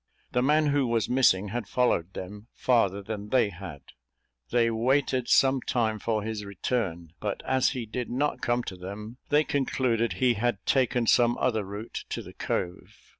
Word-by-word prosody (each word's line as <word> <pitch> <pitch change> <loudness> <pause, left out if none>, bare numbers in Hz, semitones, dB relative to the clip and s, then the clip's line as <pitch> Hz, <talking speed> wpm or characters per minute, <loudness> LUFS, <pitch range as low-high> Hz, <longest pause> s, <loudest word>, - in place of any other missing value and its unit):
The 125 - +1
man 150 +3 +3
who 140 -2 +2
was 115 -2 +1
missing 105 -6 +3
had 115 -1 -4
followed 100 -8 +1
them 105 +4 -8
farther 100 -6 +2
than 105 0 -6
they 120 -4 +3
had. 85 -6 -9 0.7
They 115 -1 +2
waited 130 +2 +1
some 135 -1 +4
time 110 -4 0
for 110 0 -1
his 110 -1 -4
return; 95 -4 -3
but 105 -2 -3
as 130 0 +2
he 120 - -3
did 120 +3 -4
not 145 +4 -1
come 120 +1 +1
to 95 - -6
them, 100 +6 -8
they 150 +1 +4
concluded 125 -5 0
he 125 -2 +2
had 115 -2 -1
taken 125 -3 +2
some 120 +1 +4
other 110 -4 +1
route 100 +3 -7
to - - -4
the - - -12
cove. 90 0 -4
115 Hz, 175 wpm, -27 LUFS, 100-125 Hz, 0.7 s, some